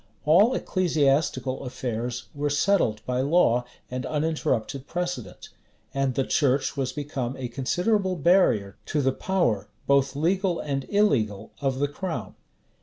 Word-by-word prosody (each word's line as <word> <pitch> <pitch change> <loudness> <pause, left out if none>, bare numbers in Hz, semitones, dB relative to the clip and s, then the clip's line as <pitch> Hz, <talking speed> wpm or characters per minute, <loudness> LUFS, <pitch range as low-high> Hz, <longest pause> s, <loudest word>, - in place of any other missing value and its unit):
All 200 +12 +5
ecclesiastical 140 -7 +1
affairs 120 -1 -4
were 145 0 -1
settled 145 - +1
by 125 0 0
law 130 -5 +3 0.3
and 125 0 -3
uninterrupted 145 -4 -1
precedent; 175 - -4 0.4
and 135 -2 0
the 135 - +2
church 140 -2 +1
was 135 -2 -1
become 135 -3 -4
a 130 -2 -3
considerable 185 - 0
barrier 150 - +3
to 150 -2 0
the 135 - +3
power, 125 - 0 0.2
both 140 -1 +2
legal 180 +4 +1
and 135 -2 -3
illegal, 125 - +1
of 135 -2 0
the 145 +1 +1
crown. 145 - -5
140 Hz, 130 wpm, -26 LUFS, 125-170 Hz, 0.4 s, All